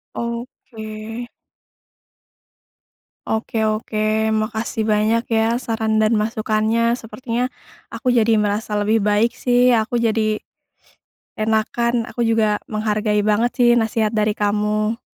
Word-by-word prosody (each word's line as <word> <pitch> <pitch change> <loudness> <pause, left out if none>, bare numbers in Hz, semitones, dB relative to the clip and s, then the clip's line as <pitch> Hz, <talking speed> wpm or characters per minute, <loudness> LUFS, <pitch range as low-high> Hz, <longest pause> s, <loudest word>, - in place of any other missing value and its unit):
Oke. 230 -1 -6 2.0
Oke 220 +1 -2
oke 215 0 -4 0.4
makasih 220 +1 -2
banyak 215 +2 +2
ya 225 +1 +2
saran 225 -2 -1
dan 215 +1 +3
masukannya, 220 +1 +1
sepertinya 240 +2 -3 0.4
aku 255 -2 -1
jadi 230 -2 +3
merasa 210 +1 -2
lebih 210 +2 +2
baik 210 +3 +3
sih 245 0 +4
aku 220 +2 -2
jadi 220 -2 0 1.0
enakan 220 +2 0 0.2
aku - - -11
juga 225 -1 +3 0.3
menghargai 210 0 0
banget 225 +4 +2
sih 245 -2 +5
nasihat 220 -1 0
dari 210 0 +2
kamu. 210 +2 0
220 Hz, 105 wpm, -20 LUFS, 215-230 Hz, 2.0 s, sih